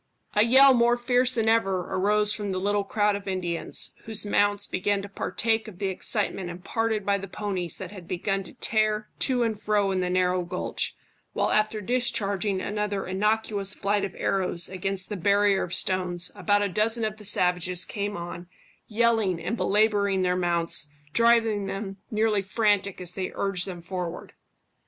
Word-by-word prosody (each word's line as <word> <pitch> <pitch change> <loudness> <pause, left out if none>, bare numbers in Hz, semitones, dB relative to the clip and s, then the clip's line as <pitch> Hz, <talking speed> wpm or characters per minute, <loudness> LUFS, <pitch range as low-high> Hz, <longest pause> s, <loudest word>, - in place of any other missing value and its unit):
A 210 - +4
yell 265 +3 +7
more 240 0 +3
fierce 250 +1 +2
than 225 -2 +1
ever 195 -5 +2
arose 210 +2 +2
from 205 -2 -3
the 185 - -2
little 205 +1 0
crowd 205 +1 +1
of 200 0 -7
Indians, 180 -3 -2
whose 220 -1 -2
mounts 205 0 +1
began 200 +1 -1
to - - -6
partake 220 +3 -1
of 205 -5 -10
the 195 0 -1
excitement 190 -1 -1
imparted 215 +4 -2
by 200 0 +2
the 195 - -7
ponies 185 -3 -3
that - - -7
had 185 -5 -11
begun 195 +2 -1
to - - -11
tear 215 -3 0
to 250 -3 +2
and 220 -3 -2
fro 205 -2 +1
in 190 - 0
the 180 -1 -1
narrow 180 0 +1
gulch, 175 - -3 0.4
while - - 0
after 215 0 +1
discharging 205 -4 0
another 205 -1 -2
innocuous 205 0 0
flight 200 +1 0
of 190 - -4
arrows 180 -3 0
against 190 0 -2
the 210 - -3
barrier 200 +1 +3
of 175 - -4
stones, 180 -1 +1
about 205 -1 +1
a - - +1
dozen 220 +4 0
of 215 0 -3
the 215 - -12
savages 180 -2 +2
came 205 -1 -4
on, 175 0 -7 0.4
yelling 220 -5 +1
and 180 +7 -2
belabouring 205 -3 +2
their 180 0 +1
mounts, 170 -4 0 0.2
driving 225 -3 +3
them 195 0 -5
nearly 215 -1 +1
frantic 200 -1 +1
as 180 -1 -3
they 185 0 -3
urged 195 -2 0
them 175 -3 -7
forward. 180 -1 -5
200 Hz, 175 wpm, -26 LUFS, 185-215 Hz, 0.4 s, yell